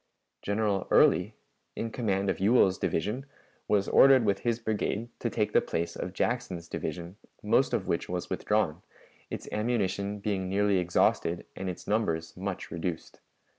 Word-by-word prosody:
General 100 -2 0
Early, - - +4 0.4
in 115 - -3
command 100 -5 -1
of - - -5
Ewell's 95 -2 +4
division, 105 +10 -1 0.4
was 100 -2 +2
ordered 135 -3 +6
with 100 -2 +1
his 115 -1 0
brigade 110 0 -2
to 120 - -1
take 105 -2 -1
the - - +5
place 85 +1 -3
of 90 - -4
Jackson's 95 -5 -2
division, 85 +2 -5 0.3
most - - +3
of - - -1
which - - -1
was - - -3
withdrawn, 95 -6 0 0.5
its - - -6
ammunition 105 -3 -1
being 100 -2 -2
nearly 100 0 +2
exhausted 85 -1 +1
and 95 -1 -4
its 90 - -7
numbers 85 -7 -1
much 95 0 -5
reduced. 85 0 -5
100 Hz, 150 wpm, -29 LUFS, 90-110 Hz, 0.5 s, ordered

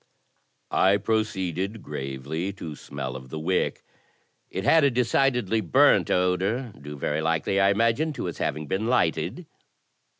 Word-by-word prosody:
I 95 +2 +4
proceeded 100 -2 -2
gravely 70 +7 -4
to 85 -5 -7
smell 65 -2 -6
of 65 -1 -9
the 80 - -6
wick. 90 +4 -1 0.7
It 95 - -4
had 160 +6 +5
a 140 - +5
decidedly 125 -3 +1
burnt 85 -8 +4
odour, 95 +7 0
due 75 +1 -8
very 75 +3 -1
likely, 80 +4 0
I 100 0 +5
imagined, 115 +9 +1
to - - -4
its 85 - -5
having 75 +2 -2
been 95 +9 -2
lighted. 120 -10 0
95 Hz, 140 wpm, -25 LUFS, 80-110 Hz, 0.7 s, had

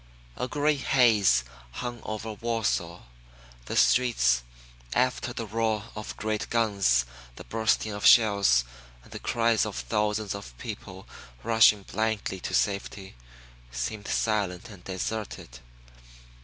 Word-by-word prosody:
A 125 - -3
gray 150 +2 +1
haze 110 - +4 0.3
hung 120 - -5
over 110 +1 -5
Warsaw. 105 -6 -2 0.6
The - - -5
streets, 65 - +3 0.5
after 125 0 0
the 115 -1 -5
roar 110 0 -1
of 105 -1 -7
great 110 0 -2
guns, 100 - +2 0.3
the - - -10
bursting 110 -1 0
of 105 0 -6
shells, 100 - +5 0.4
and - - -19
the - - -7
cries 115 -2 +1
of - - -4
thousands 105 - -1
of 100 -12 -9
people - - -8 0.4
rushing 110 -3 +5
blindly 110 -2 -2
to - - -5
safety, 100 -1 -2 0.6
seemed 65 - -4
silent 105 -1 -1
and 100 -4 -13
deserted. 95 - -5
105 Hz, 120 wpm, -27 LUFS, 95-115 Hz, 0.6 s, shells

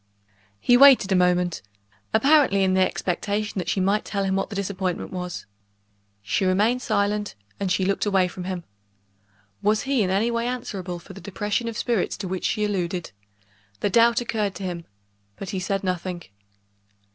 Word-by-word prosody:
He 245 - +5
waited 265 -7 +7
a - - +4
moment, 180 -1 +2 0.5
apparently 260 -4 +4
in 190 -1 +2
the 190 - +3
expectation 205 +3 -1
that 175 -1 -3
she 195 - 0
might 200 +3 +2
tell 200 -1 -2
him 190 0 0
what 195 - -1
the 210 - -7
disappointment 190 -2 -3
was. 180 -1 -5 0.8
She 115 - 0
remained 210 +7 +2
silent, 205 - 0 0.2
and 195 -2 -1
she 190 0 +1
looked 195 +2 0
away 190 -2 +3
from 180 0 -7
him. 185 -2 -4 1.0
Was 210 +1 +2
he 270 -3 +1
in 190 - +1
any 205 +5 +1
way 235 0 -1
answerable 195 -8 -4
for 185 +3 -12
the 195 - -11
depression 210 +3 -2
of 230 -2 -4
spirits 235 -7 0
to 195 - -5
which 185 0 -3
she 210 - +1
alluded? 180 -4 -2 0.7
The 200 - 0
doubt 235 +3 +4
occurred 215 -4 -2
to 195 - -7
him 175 -2 -4 0.5
but 195 - -6
he 190 - -2
said 195 +1 -2
nothing. 180 -1 -3
195 Hz, 175 wpm, -24 LUFS, 185-215 Hz, 1.0 s, waited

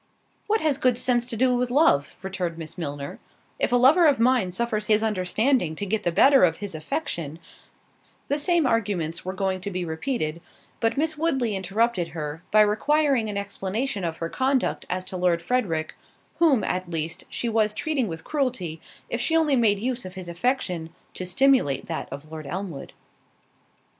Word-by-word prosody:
"What 435 +1 +2
has 300 -4 +1
good 250 -2 +2
sense 245 -1 +2
to 235 -3 -2
do 255 +2 +3
with 245 0 0
love?" 245 - +3
returned 180 -3 -3
Miss 160 -2 -7
Milner—"If 145 - -5
a - - +4
lover 280 +8 +6
of 285 -5 +3
mine 240 -5 +3
suffers 215 +2 -2
his 215 0 +3
understanding 210 - +1
to 205 - -3
get 215 +2 -1
the 175 - 0
better 270 +10 +6
of 165 -2 +3
his 205 -3 -5
affection—" 160 - -3 0.9
The 285 - 0
same 340 +1 +2
arguments 195 -9 0
were 185 - -4
going 190 -1 -1
to 200 - -3
be 185 -2 -3
repeated; 160 - -3 0.4
but 225 +3 0
Miss 310 +1 0
Woodley 265 -10 0
interrupted 195 0 0
her, 150 +1 -4
by 215 - +6
requiring 255 +3 +2
an 205 - -3
explanation 200 +3 -3
of 165 -1 -2
her 165 - -3
conduct 265 +4 0
as 185 0 -2
to 185 - -6
Lord 180 -2 +2
Frederick, 170 -6 -1 0.5
whom, 295 -10 +4
at 180 -1 -2
least, 165 0 -3
she 240 - -3
was 220 -2 +2
treating 275 +1 -1
with 160 -2 -6
cruelty, 245 - -2 0.3
if 240 - -2
she 325 +5 +2
only 305 -4 +3
made 220 -5 +3
use 245 +4 -2
of 185 0 -9
his 185 -2 -7
affection 175 -3 -1 0.2
to 185 - -5
stimulate 245 - +3
that - - -5
of 140 +3 -9
Lord 155 -2 -7
Elmwood. 180 -2 -6
210 Hz, 180 wpm, -25 LUFS, 175-255 Hz, 0.9 s, lover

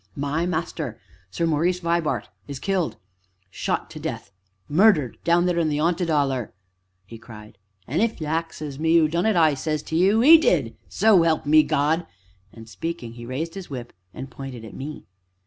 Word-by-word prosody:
"My 145 +5 -1
master 160 -8 -4 0.3
Sir 165 - -2
Maurice 165 +3 +1
Vibart 170 -2 -1 0.2
is 140 -2 -6
killed 185 +2 -1 0.6
shot - - -3
to - - -8
death 100 - -6 0.4
murdered 155 - +3
down 170 +1 +3
there 175 -1 +1
in 160 -2 +1
the 145 - -1
'aunted 170 +2 0
'Oller!" 135 - 0 0.5
he 115 +4 -11
cried, 110 -3 -13 0.3
"and, 150 +10 -1
if 230 -3 0
you 155 - -4
axes 155 -2 -4
me 165 +1 +3
who 160 -2 +4
done 170 +6 0
it, 220 - +2
I 160 -3 +4
says 155 +2 -3
to 160 - -5
you 200 +7 +3
'e 320 +4 +9
did 145 - +1
so 210 -3 +4
'elp 165 -2 +1
me 155 +1 +6
God!" 155 +2 0 0.4
and 115 -1 -13
speaking, 145 -2 -6
he 120 0 -10
raised 155 +6 -4
his 190 -1 -8
whip 125 -4 -7 0.2
and 135 +6 -9
pointed 125 -3 -8
at 110 - -11
me. 150 +3 -8
155 Hz, 180 wpm, -23 LUFS, 135-170 Hz, 0.6 s, e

